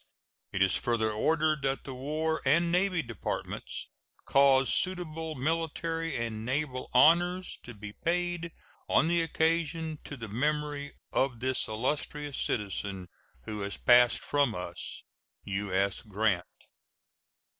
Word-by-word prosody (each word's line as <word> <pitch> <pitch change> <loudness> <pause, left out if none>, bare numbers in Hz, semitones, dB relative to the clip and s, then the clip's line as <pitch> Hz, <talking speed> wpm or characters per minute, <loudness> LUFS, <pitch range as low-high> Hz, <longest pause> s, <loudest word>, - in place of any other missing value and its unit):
It 95 - +2
is 95 - +3
further 110 -2 +1
ordered 155 +6 +1
that 135 0 -1
the 135 - -6
War 155 +5 -1
and 170 +5 +3
Navy 180 -1 +2
Departments 115 -6 -5 0.4
cause 135 -1 +5
suitable 165 -3 0
military 165 +2 -1
and 115 -2 -3
naval 130 +1 -2
honors 175 +7 +4
to 120 - -10
be 105 0 -8
paid 175 +1 -1 0.4
on - - +4
the 170 0 +3
occasion 160 -1 0
to 140 - -7
the 115 -2 -6
memory 145 +5 -1 0.2
of 130 -3 +1
this 130 +1 0
illustrious 145 +5 -2
citizen 100 -3 -2 0.3
who 105 +10 -5
has 100 0 -4
passed 125 0 +5
from 140 -6 +1
us. 90 -1 -6 0.4
U.S. 100 -1 -1
GRANT. 105 -4 0
140 Hz, 125 wpm, -30 LUFS, 110-160 Hz, 0.4 s, cause